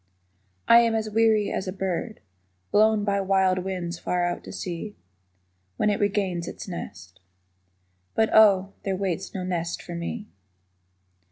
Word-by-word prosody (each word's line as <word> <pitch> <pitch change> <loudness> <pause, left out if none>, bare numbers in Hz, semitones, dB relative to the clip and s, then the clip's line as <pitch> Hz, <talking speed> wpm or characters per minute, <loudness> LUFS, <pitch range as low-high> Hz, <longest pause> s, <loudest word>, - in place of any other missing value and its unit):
I 235 - +8
am 230 -1 +2
as 215 -1 -2
weary 220 -1 +3
as 190 - -3
a - - -2
bird 190 +4 -3 0.5
Blown 215 0 +4
by 200 -1 +1
wild 190 -1 +2
winds 180 -2 -4
far 175 0 0
out 175 - -3
to - - -8
sea 185 +4 -5 0.8
When 210 - +2
it 205 - -1
regains 195 -4 0
its - - -7
nest. 90 - -8 1.0
But, 220 0 +2
Oh, 200 -3 +5
There 195 -1 -2
waits 190 0 -3
no 185 - -3
nest 175 -2 -2
for 175 - -8
me. 170 +6 -4
190 Hz, 150 wpm, -25 LUFS, 180-210 Hz, 1.0 s, I